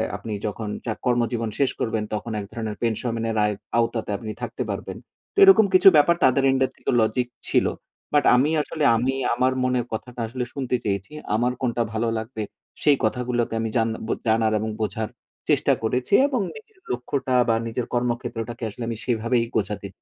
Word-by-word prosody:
আপনি 105 +1 -5
যখন 105 0 -4 0.2
চা 115 - -1
কর্মজীবন 120 -2 +1
শেষ 140 - +3
করবেন 110 -2 -1
তখন 110 +2 -3
এক 100 - -5
ধরনের 110 -2 -4
পেনশন 115 0 -1
আয়ত 105 -1 -2 0.2
আওতাতে 115 -2 0
আপনি 110 +1 -6
থাকতে - - -3
পারবেন। - - -4 0.4
তো - - -29
এরকম 385 - +8
কিছু 185 +1 +6
ব্যাপার 170 +4 +5
তাদের 135 +1 +4
এন্ডের 130 0 +1
থেকে - - -5
লজিক 110 +3 +1 0.2
ছিল। - - +3 0.5
বাট 145 - +4
আমি 130 +4 +3
আসলে 150 +1 -4
আমি 125 +4 +1 0.2
আমার 130 +2 +2
মনের 125 -2 +1
কথাটা 125 +2 -6
আসলে 125 +2 -3
শুনতে 130 -3 -1
চেয়েছি, 100 +3 -2 0.2
আমার 120 +3 +1
কোনটা 120 -2 0
ভালো 115 +1 0
লাগবে? 110 0 -4 0.4
সেই 145 -2 +5
কথাগুলোকে 120 +1 0
আমি 115 - -1
জান 115 0 +2 0.2
ব - - -8 0.2
জানার 110 0 +3
এবং 110 - -2
বোঝার 110 0 -2 0.4
চেষ্টা - - +3
করেছি 125 +3 -1
এবং 260 -6 0
নিজের 440 -3 -14
লক্ষ্যটা 130 +2 -2 0.2
বা 115 - +4
নিজের 115 +1 -3
কর্মক্ষেত্রটাকে 120 -1 -2
আসলে 110 +3 -7
আমি 115 - -3
সেইভাবেই 115 0 +1
গোছাতে 105 -2 -1
120 Hz, 175 wpm, -24 LUFS, 110-130 Hz, 0.5 s, এরকম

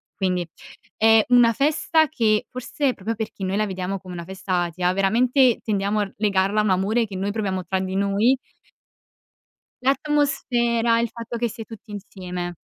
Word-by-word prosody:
quindi 180 -3 -1 0.5
è 225 0 +5
una 245 -2 +6
festa 305 +4 +2
che, 220 -7 +1
forse 255 +1 -2
proprio 220 +4 -4
perché 215 -3 -6
noi 190 +2 -1
la 215 - +1
vediamo 190 0 -3
come 185 -1 -10
una 170 -1 -6
festa 185 -1 -2
atea, 180 +1 -1
veramente 240 +6 +3
tendiamo 205 0 0
r 195 - -8
legarla 200 0 +1
a - - +3
un 210 - 0
amore 210 +5 +1
che 195 - -8
noi 195 +2 -2
proviamo 190 -4 -2
tra 190 +2 -1
di 190 0 -3
noi 200 +6 +2 1.5
L'atmosfera, 250 -5 +1
il 235 -1 0
fatto 235 0 -7
che 235 0 -1
si 230 +1 -9
è - - -7
tutti 225 -1 -12
insieme. 180 -3 -6
210 Hz, 170 wpm, -23 LUFS, 190-235 Hz, 1.5 s, una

